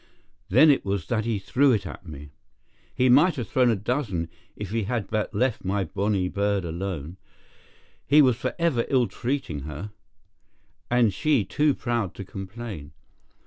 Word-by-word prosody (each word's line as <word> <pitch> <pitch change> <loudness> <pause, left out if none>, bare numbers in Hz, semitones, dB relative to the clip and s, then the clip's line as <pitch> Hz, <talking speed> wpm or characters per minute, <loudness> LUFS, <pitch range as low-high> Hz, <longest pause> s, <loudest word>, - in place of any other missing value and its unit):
Then 145 +10 +7
it 140 - +1
was 100 -4 -2
that 110 -2 0
he 115 -2 0
threw 125 +9 +2
it 105 -5 +1
at 90 +1 -9
me. 75 -2 -9 0.6
He 130 - +3
might 145 +7 +5
have 120 -6 -4
thrown 125 +2 +3
a 115 - +3
dozen 100 - -2 0.3
if 105 -2 -6
he 115 -2 -1
had 110 -2 -3
but 110 -1 -1
left 120 +3 0
my 95 +1 0
bonny 100 +1 -1
bird 100 0 0
alone. 85 -1 -5 0.9
He 145 +2 +6
was 130 -5 +6
forever 150 -1 0
ill 130 -3 +3
treating 130 - -3
her, 75 +8 -7 1.0
and 120 -4 +3
she 140 - +1
too 150 -2 +1
proud 120 -7 -2
to 100 - -6
complain. 95 -5 -8
105 Hz, 160 wpm, -25 LUFS, 95-125 Hz, 1.0 s, Then